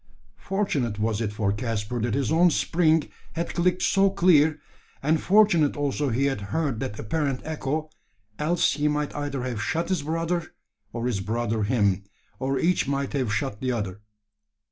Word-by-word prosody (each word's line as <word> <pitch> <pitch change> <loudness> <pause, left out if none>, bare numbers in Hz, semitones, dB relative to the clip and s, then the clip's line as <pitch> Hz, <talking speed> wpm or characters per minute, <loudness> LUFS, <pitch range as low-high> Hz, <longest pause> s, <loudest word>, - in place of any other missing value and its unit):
Fortunate 155 - -1
was 110 0 0
it 105 -3 -1
for 105 -2 0
Caspar 110 +1 -2
that 115 0 0
his 140 +1 0
own 170 +2 +5
spring 160 -1 +2 0.3
had 170 +1 -3
clicked 180 +1 +1
so 195 0 +4
clear 160 -5 +4 0.4
and 155 +2 +2
fortunate 185 -8 +4
also 145 0 0
he 130 +4 +1
had 135 -7 -1
heard 140 -2 -1
that 115 -5 -4
apparent 140 +3 -1
echo 155 0 -3 0.5
else 165 +3 +2
he 150 0 0
might 150 0 -1
either 145 -3 -3
have 120 -4 -3
shot 165 - -1
his 185 -5 +1
brother, 165 +2 -2 0.4
or 115 0 -4
his 120 -5 0
brother 110 +2 -1
him, 100 -3 +1 0.4
or 135 +1 0
each 170 +1 +1
might 140 0 -1
have 130 -6 0
shot 105 0 -2
the 130 -1 0
other! 105 -4 -3
140 Hz, 165 wpm, -25 LUFS, 115-160 Hz, 0.5 s, own